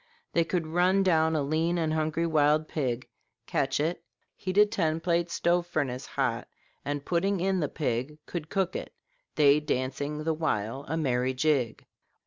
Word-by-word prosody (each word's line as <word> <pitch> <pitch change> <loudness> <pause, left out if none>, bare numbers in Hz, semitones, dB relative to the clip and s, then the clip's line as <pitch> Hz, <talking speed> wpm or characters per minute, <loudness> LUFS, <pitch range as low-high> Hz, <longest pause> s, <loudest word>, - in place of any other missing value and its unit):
They 170 - +4
could 165 0 -1
run 180 +4 +3
down 160 -3 +3
a 150 - +1
lean 160 +4 0
and 160 -2 0
hungry 155 +1 0
wild 155 -1 +3
pig, 130 -5 -2 0.4
catch 135 0 0
it, 160 +4 -1 0.3
heat 185 0 -4
a 210 - +8
ten 165 -7 0
plate 170 0 0
stove 175 +1 +1
furnace 140 -7 -2
hot, - - -1 0.4
and 145 0 -3
putting 190 +3 +1
in 190 +1 +1
the 150 - 0
pig, 135 0 -2
could 165 -3 -5
cook 190 -2 0
it, - - -6 0.4
they 145 -1 +5
dancing 145 +1 -2
the 160 +1 +1
while 135 -4 -2
a 160 - -2
merry 130 -4 0
jig." 130 -5 0
155 Hz, 165 wpm, -28 LUFS, 140-170 Hz, 0.4 s, a